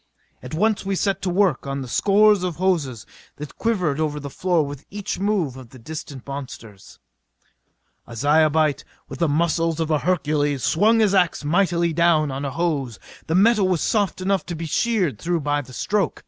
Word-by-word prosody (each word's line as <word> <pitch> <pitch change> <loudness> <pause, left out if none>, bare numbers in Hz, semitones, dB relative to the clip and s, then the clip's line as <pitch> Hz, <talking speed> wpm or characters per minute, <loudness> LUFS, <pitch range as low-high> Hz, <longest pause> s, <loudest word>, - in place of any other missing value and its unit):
At - - -7
once 215 +5 +1
we 195 0 -2
set 195 0 -1
to 190 - -1
work 180 -7 +1
on 140 0 -3
the - - -8
scores 205 - +4
of 180 -3 -2
hoses 155 - -1 0.3
that 150 -1 -10
quivered 180 -11 0
over 150 -1 -1
the 140 -1 -7
floor 175 -2 +1
with 140 0 -8
each 205 -1 -5
move 195 -9 0
of 130 -3 -12
the 130 - -14
distant 140 0 -8
monsters. 120 -7 -9 1.1
A 115 - -10
Zyobite 155 +2 +2 0.2
with - - -9
the 170 -3 +2
muscles 165 +1 0
of 160 -1 -1
a 150 - +2
Hercules 150 -6 0
swung 220 +6 +3
his 205 -2 +3
ax 180 -5 +2
mightily 170 0 +1
down 160 -3 +2
on 135 +2 -4
a - - -2
hose. 140 - -2 0.3
The 160 - 0
metal 205 0 +4
was 180 -4 0
soft 205 -4 0
enough 195 0 0
to 175 - -4
be 165 +1 -5
sheered 180 - 0
through 170 -1 -1
by 145 0 0
the 130 -2 -14
stroke. 195 - -1
165 Hz, 190 wpm, -22 LUFS, 145-190 Hz, 1.1 s, scores